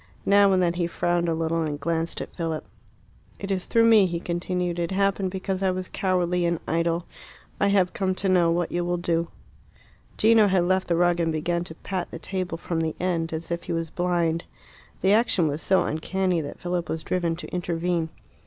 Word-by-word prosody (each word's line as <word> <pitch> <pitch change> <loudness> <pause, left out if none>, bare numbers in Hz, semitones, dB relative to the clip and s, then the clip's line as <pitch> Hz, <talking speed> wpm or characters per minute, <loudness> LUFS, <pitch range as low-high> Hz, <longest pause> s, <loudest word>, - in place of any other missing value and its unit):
Now 200 0 +5
and 185 -1 +3
then 170 -1 +2
he 175 -1 -1
frowned 175 0 0
a 165 - +1
little 165 0 0
and 150 -2 -2
glanced 165 +2 -2
at - - -7
Philip. 165 -3 -3 0.7
"It 200 0 -5
is 185 -2 -1
through 230 - +4
me," 220 -4 +6
he 170 -1 -3
continued. 175 0 -2
"It 170 -1 -1
happened 195 0 +1
because 190 0 -3
I 190 - +2
was 185 0 -3
cowardly 180 -2 +1
and 170 -1 +1
idle. 170 +1 0 0.5
I 200 - +3
have 195 -3 +2
come 190 -1 0
to 195 - -2
know 180 -3 +4
what 170 0 0
you 175 0 0
will 175 0 0
do." 170 -1 0 0.9
Gino 220 -1 +5
had 185 -2 +3
left 185 +1 +1
the 170 - +2
rug, 175 0 +3
and 165 -1 +1
began 170 +2 -1
to 160 - -10
pat 185 0 -4
the - - -7
table 185 -1 -3
from 170 0 -3
the 160 -1 -2
end, 170 -2 -1
as 165 +1 -5
if 170 0 -3
he 175 - -3
was 165 -1 -3
blind. 175 -2 0 0.6
The 190 +1 +4
action 210 -7 +3
was 150 +2 -2
so 190 - +3
uncanny 180 +2 -1
that 145 - -7
Philip 175 -2 -2
was 160 - -3
driven 170 -2 0
to 175 - -8
intervene. 175 -1 -1
175 Hz, 210 wpm, -25 LUFS, 165-185 Hz, 0.9 s, me